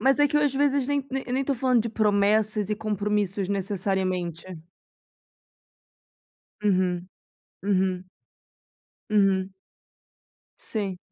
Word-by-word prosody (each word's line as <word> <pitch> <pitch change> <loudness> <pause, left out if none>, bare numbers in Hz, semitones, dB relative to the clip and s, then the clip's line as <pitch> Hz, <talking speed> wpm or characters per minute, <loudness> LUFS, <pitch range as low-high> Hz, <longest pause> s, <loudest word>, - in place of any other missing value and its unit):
Mas 270 +3 +3
é 290 - +6
que 290 - 0
eu, 295 - +3
às 285 -2 +1
vezes, 280 -1 +2
nem 285 -1 0
nem 270 0 -2
nem 260 +2 -1
tô 275 - 0
falando 250 -2 +2
de 230 - -3
promessas 210 0 +2
e - - +2
compromissos, 205 -2 -1
necessariamente. 190 -3 -1 2.2
Uhum. 185 -3 +1 0.6
Uhum. 185 -2 0 1.0
Uhum. 195 -2 +3 1.1
Sim. 200 -4 -4
210 Hz, 110 wpm, -26 LUFS, 190-250 Hz, 2.2 s, é